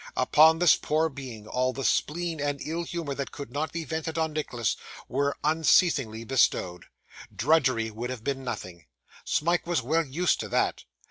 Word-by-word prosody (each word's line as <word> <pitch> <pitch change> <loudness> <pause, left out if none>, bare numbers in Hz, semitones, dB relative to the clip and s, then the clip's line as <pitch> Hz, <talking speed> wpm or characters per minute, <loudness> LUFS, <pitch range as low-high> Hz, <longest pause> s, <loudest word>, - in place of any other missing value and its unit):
Upon 155 +5 +5
this 175 -1 +6
poor 160 +2 +1
being, 130 -7 -9
all 130 +3 0
the 135 - -5
spleen 165 +4 0
and 145 -1 -1
ill 165 +2 -2
humour 170 -4 -4
that 140 0 -5
could 140 - -8
not 145 +1 -2
be 165 -1 -4
vented 160 0 -4
on 160 -1 0
Nicholas 120 -8 -1 0.3
were 140 +2 -1
unceasingly 150 -7 +3
bestowed. 105 -7 +1 0.5
Drudgery 130 -6 +2
would 115 +3 -5
have 125 -4 -6
been 135 0 -2
nothing 90 - -6 0.4
Smike 170 +2 0
was 170 -7 0
well 160 +6 +1
used 160 +5 0
to - - -4
that. - - 0
145 Hz, 170 wpm, -27 LUFS, 125-160 Hz, 0.5 s, this